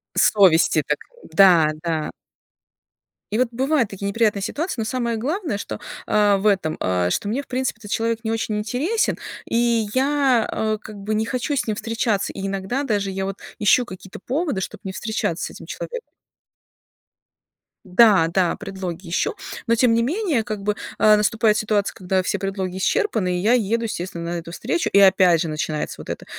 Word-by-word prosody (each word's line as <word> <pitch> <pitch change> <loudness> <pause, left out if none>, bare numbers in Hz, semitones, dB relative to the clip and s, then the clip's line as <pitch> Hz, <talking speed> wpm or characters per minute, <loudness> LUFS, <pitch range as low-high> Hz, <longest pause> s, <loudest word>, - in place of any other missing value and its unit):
Совести 175 -6 +4
так 150 - 0 0.3
да, 175 -6 +6
да. 160 -3 -2 1.2
И 215 - 0
вот 250 -1 +2
бывают 260 -1 +1
такие 200 0 -5
неприятные 210 -1 +1
ситуации, 315 - -3
но - - -2
самое 235 -1 -1
главное, 295 - -2
что, 205 - -6 0.3
а, 205 -1 +3
в 200 - 0
этом, 190 -6 +1
а, 90 -1 0
что 200 - -1
мне, 235 +7 -1
в - - -23
принципе, 255 -2 -2
этот 205 -2 -10
человек 230 0 0
не 220 - -1
очень 225 -1 -1
интересен, 270 - 0 0.3
и 230 -2 +1
я, 265 -3 +2
э, 215 0 -1
как 215 - -10
бы 205 +2 -3
не 215 +1 0
хочу 255 +5 -2
с 255 - -1
ним 215 - 0
встречаться. 225 -2 -1
И 195 0 -4
иногда 195 +8 -2
даже 205 -6 -1
я 190 0 -3
вот 195 0 -4 0.2
ищу 215 +4 +4
какие-то 185 -3 -10
поводы, 280 - -1
чтобы - - -6
не 190 - -3
встречаться 215 -6 -2
с - - -5
этим - - -11
человеком. 485 0 -6 1.9
Э, - - -16
да-да, 180 -4 +4
предлоги 185 -2 -6
ищу. 175 - 0 0.3
Но 230 - +4
тем 230 0 +3
не 230 - +2
менее, 310 - 0
как 210 -2 -5
бы, 210 +1 0 0.2
а, 215 -1 +6
наступает 215 0 +2
ситуация, 210 -2 0
когда 185 0 -1
все - - -1
предлоги 190 -2 -3
исчерпаны, 200 - 0
и - - -3
я 220 +5 +3
еду, 230 -1 +1
естественно, 175 -5 -4
на 175 - -2
эту 170 0 -9
встречу. 345 - -1
И 200 - +7
опять 185 -4 +5
же - - -1
начинается 155 0 -3
вот - - -11
это: - - -5
210 Hz, 185 wpm, -22 LUFS, 190-235 Hz, 1.9 s, И